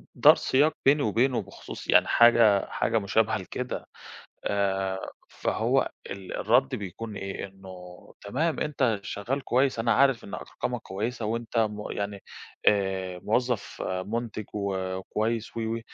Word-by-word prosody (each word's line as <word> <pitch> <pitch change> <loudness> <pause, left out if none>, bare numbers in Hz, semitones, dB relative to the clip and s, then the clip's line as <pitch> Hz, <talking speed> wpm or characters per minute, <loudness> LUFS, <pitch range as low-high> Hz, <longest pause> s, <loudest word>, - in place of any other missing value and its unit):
دار - - +8
سياق 145 +4 +2
بيني 145 +2 +5
وبينه 120 +3 +2
بخصوص 95 - -10
يعني - - +5
حاجة، 115 -4 +6
حاجة 115 - 0
مُشابهة 110 +2 +1
لكده. 125 +6 -5 0.6
آآ 95 -1 -1 0.2
فهو - - 0 0.2
ال 95 -1 -6
الرد 70 - +3
بيكون 105 +2 -6
إيه؟ 95 0 -4
إنه 95 -1 -12 0.4
تمام 150 +11 -1
أنت 130 -7 +1
شغّال 125 +8 -3
كويس، 130 0 +2
أنا 115 +1 +2
عارف 135 -3 +3
إن - - -7
أرقامك - - -4
كويسة، 110 +5 -3
وأنت 115 +2 -2
مُ 105 -2 -1
يعني 100 -1 -4 0.5
آآ 95 -3 0
موظف 120 -1 -1
مُنتج 110 +4 -3
وكويس 100 +3 -2
و - - -1
و 115 +1 -2
110 Hz, 130 wpm, -27 LUFS, 95-120 Hz, 0.6 s, دار